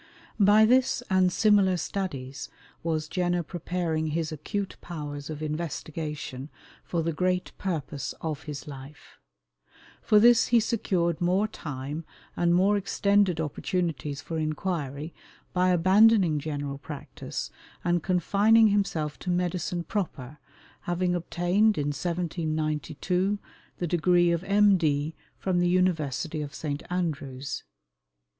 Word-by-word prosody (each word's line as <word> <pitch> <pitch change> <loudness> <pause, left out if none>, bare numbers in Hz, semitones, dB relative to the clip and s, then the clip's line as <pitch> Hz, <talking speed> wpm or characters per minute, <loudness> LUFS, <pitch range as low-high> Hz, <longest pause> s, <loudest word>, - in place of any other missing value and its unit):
By 210 +2 +6
this 250 +1 +3
and 185 -1 +4
similar 200 -2 +4
studies 145 -7 -4 0.3
was 160 -2 -1
Jenner 175 0 0
preparing 170 -1 -2
his 160 +1 -2
acute 195 +6 -4
powers 145 -4 -6
of 155 0 -5
investigation 150 -3 -4 0.3
for 170 -2 -2
the 165 0 -1
great 180 +2 0
purpose 150 -6 -3
of 155 -2 -4
his 150 0 -6
life. 135 0 -11 0.8
For 210 - +4
this 235 +1 +6
he 235 - +5
secured 180 -7 0
more 185 +4 +2
time 145 -4 -6 0.3
and 175 0 +3
more 195 +3 +4
extended 200 -2 +2
opportunities 155 -2 -2
for 165 -1 -3
inquiry 155 -2 -3 0.4
by 185 0 +3
abandoning 185 -1 +5
general 145 -2 -4
practice, 145 -1 -6 0.3
and 175 0 +1
confining 205 +6 +4
himself 170 -7 0
to 180 - -5
medicine 175 -1 -1
proper, 150 - -4 0.5
having 175 +1 0
obtained, 180 +5 +2
in 145 -1 0
1792, 160 +3 -1 0.4
the 175 - -2
degree 175 +1 +3
of 170 +1 0
M.D. 175 -7 +3 0.2
from 185 -2 0
the 175 0 +2
University 165 -4 0
of 145 0 -6
St. 145 -2 -3
Andrews. 140 -6 -3
170 Hz, 120 wpm, -27 LUFS, 150-185 Hz, 0.8 s, By